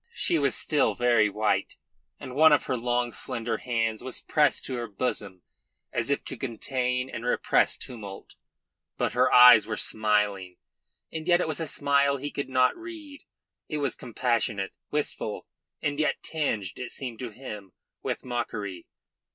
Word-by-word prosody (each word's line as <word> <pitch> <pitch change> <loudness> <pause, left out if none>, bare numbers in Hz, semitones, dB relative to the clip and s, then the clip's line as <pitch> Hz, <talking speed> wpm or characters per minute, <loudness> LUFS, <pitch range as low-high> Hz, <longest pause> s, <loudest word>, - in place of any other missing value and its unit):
She 170 - +1
was 140 -3 +1
still 150 -3 +1
very 120 -3 +3
white, 105 +1 0 0.4
and 130 - -8
one 155 +3 +6
of 150 - +4
her 130 - -1
long, 120 0 0
slender 115 +3 -3
hands 115 -2 -1
was 130 0 -1
pressed 150 -2 +2
to 130 - -3
her 120 -1 -4
bosom 100 -4 -4 0.5
as 120 +2 -1
if 140 - 0
to - - -5
contain 125 +1 -2
and 115 -3 -7
repress 125 - +2
tumult. 105 -5 -9 0.6
But - - 0
her - - +3
eyes 125 -3 +9
were 110 -1 -3
smiling, 105 -4 0 0.6
and 160 +1 -5
yet 175 -1 +5
it 180 - 0
was 155 0 -2
a 165 - -2
smile 140 -1 +2
he 145 +2 -5
could 140 - -4
not 130 -1 +3
read; 325 -4 -10 0.5
it 150 - -2
was 140 -3 0
compassionate, 115 -4 -1 0.2
wistful, 145 -7 -2 0.4
and 145 0 -1
yet 155 - 0
tinged, 110 - -2
it 125 - -5
seemed 125 -4 -5
to 125 - -4
him, 105 -5 -9 0.3
with - - -4
mockery. 105 -7 -4
125 Hz, 160 wpm, -27 LUFS, 110-140 Hz, 0.6 s, eyes